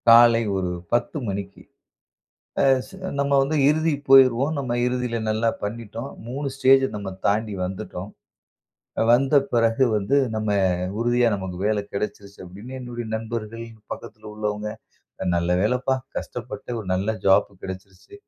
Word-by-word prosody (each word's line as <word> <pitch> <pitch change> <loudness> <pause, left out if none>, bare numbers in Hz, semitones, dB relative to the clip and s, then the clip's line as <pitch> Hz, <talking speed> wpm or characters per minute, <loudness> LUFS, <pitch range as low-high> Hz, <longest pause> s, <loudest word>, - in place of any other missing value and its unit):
காலை 115 0 +8 0.2
ஒரு 90 -1 -1 0.2
10 120 +5 0
மணிக்கு 100 0 -5 1.0
அ - - +4 0.2
ஸ் - - -16 0.3
நம்ம 140 0 +1
வந்து 145 +3 0
இறுதிக்கு 155 -1 +1
போய்டுவோம். 135 +1 +6
நாம் 130 -4 -2
இறுதியில 125 -1 -1
நல்லா 110 +2 +1
பண்ணிட்டோம். 115 +3 -5 0.2
3 135 +4 -4
ஸ்டேஜ் 135 0 +5
நம்ம 100 -2 -5 0.2
தாண்டி 105 +1 +1
வந்துட்டோம். 95 +1 -6 1.0
வந்த 135 +4 +4 0.2
பிறகு 115 +2 +3
வந்து 105 +7 0 0.2
நம்ம 110 0 -2 0.5
உறுதியா 120 +1 +3
நமக்கு 95 -2 -6
வேலை 105 -1 +1
கிடைச்சிருச்சு 100 0 -5
அப்படின்னு 100 +8 -10
என்னுடைய 120 -2 -6
நண்பர்கள் 115 0 -5 0.3
பக்கத்தில 110 -1 -8
உள்ளவங்க 105 0 -3 0.7
"நல்ல 85 0 0
வேலைப்பா 125 +5 +1 0.2
கஷ்டப்பட்டு 120 -3 -6
ஒரு 105 - -8
நல்ல 95 +3 0 0.2
ஜாப் 95 -1 +5
கிடைச்சிருச்சு. 95 - -9
115 Hz, 130 wpm, -24 LUFS, 105-125 Hz, 1.0 s, காலை